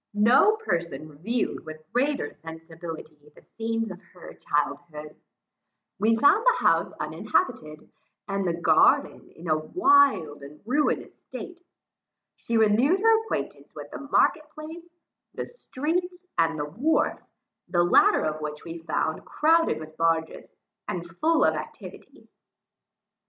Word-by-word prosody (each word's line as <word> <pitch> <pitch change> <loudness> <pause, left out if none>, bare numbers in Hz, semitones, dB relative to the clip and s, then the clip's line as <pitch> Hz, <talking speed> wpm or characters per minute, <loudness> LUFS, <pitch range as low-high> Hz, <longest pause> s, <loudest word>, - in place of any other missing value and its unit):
No 245 - +5
person 170 - -3
reviewed 190 +11 -3
with 155 0 -10
greater 270 - 0
sensibility, 160 -1 -10
the - - -19
scenes 225 -1 -2
of 185 +1 -10
her 180 - -11
childhood. 150 +1 -3 0.8
We 220 +3 +3
found 285 - +4
the - - +2
house - - +3
uninhabited, 155 - -2 0.4
and 195 -1 -1
the 170 0 -2
garden 160 -2 +3
in 170 +2 -10
a 155 -1 +2
wild 270 - +3
and 140 +2 -12
ruinous 290 +6 -1
state. 355 -1 -10 0.7
She 230 - -2
renewed 225 - +3
her 450 +1 +4
acquaintance - - -5
with - - -9
the - - -7
market 300 +2 +1
place, 320 +3 -10 0.5
the - - -4
streets, 355 - -4
and 165 -1 +1
the 145 - -2
wharf, 245 - 0 0.5
the 175 -1 +2
latter 175 - +4
of 155 0 -3
which 150 0 -6
we 165 0 -7
found 160 -1 -2
crowded 330 +2 +2
with 155 0 -11
barges, 165 -1 0 0.4
and 175 -1 -4
full 325 +1 +3
of - - +3
activity. - - -10
190 Hz, 130 wpm, -26 LUFS, -, 0.8 s, No